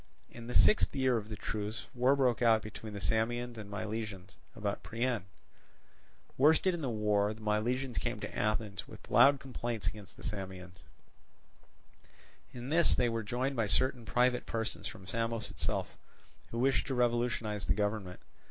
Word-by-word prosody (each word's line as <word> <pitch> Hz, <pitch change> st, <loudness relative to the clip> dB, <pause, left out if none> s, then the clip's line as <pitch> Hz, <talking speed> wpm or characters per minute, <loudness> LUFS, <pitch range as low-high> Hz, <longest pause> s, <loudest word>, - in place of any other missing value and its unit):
In 120 Hz, -1 st, -9 dB
the 125 Hz, -, -5 dB
sixth 210 Hz, -, +5 dB
year 130 Hz, -2 st, +3 dB
of 110 Hz, -2 st, -3 dB
the 110 Hz, -, -4 dB
truce, 105 Hz, +2 st, -4 dB
war 125 Hz, +3 st, +4 dB
broke 125 Hz, -4 st, +2 dB
out 110 Hz, -3 st, +5 dB
between 105 Hz, 0 st, -8 dB
the 100 Hz, -, -5 dB
Samians 115 Hz, +5 st, -1 dB
and 105 Hz, -2 st, -8 dB
Milesians 105 Hz, -3 st, -5 dB, 0.2 s
about 105 Hz, -2 st, -2 dB
Priene. 115 Hz, -3 st, -1 dB, 1.1 s
Worsted 160 Hz, +6 st, +5 dB
in 170 Hz, -, -3 dB
the 135 Hz, -, -1 dB
war, 105 Hz, -2 st, +2 dB
the 110 Hz, -, -14 dB
Milesians 120 Hz, +5 st, 0 dB
came -, -, -3 dB
to -, -, -6 dB
Athens 105 Hz, -2 st, -1 dB
with -, -, -13 dB
loud 140 Hz, 0 st, +7 dB
complaints 120 Hz, -5 st, -4 dB
against 105 Hz, -3 st, -5 dB
the -, -, -12 dB
Samians. 95 Hz, -4 st, -6 dB, 1.7 s
In 125 Hz, +1 st, -7 dB
this 165 Hz, 0 st, +4 dB
they 120 Hz, -, +2 dB
were 115 Hz, 0 st, -1 dB
joined 125 Hz, +6 st, -1 dB
by 115 Hz, -3 st, +1 dB
certain 125 Hz, +4 st, +2 dB
private 125 Hz, +2 st, +2 dB
persons 110 Hz, -1 st, -2 dB
from 95 Hz, -, -9 dB
Samos 115 Hz, +1 st, -2 dB
itself, -, -, -2 dB, 0.5 s
who 115 Hz, -, -5 dB
wished 130 Hz, +3 st, +2 dB
to 135 Hz, -, -1 dB
revolutionize 120 Hz, -5 st, 0 dB
the -, -, +3 dB
government. 105 Hz, -3 st, -2 dB
115 Hz, 160 wpm, -32 LUFS, 105-125 Hz, 1.7 s, loud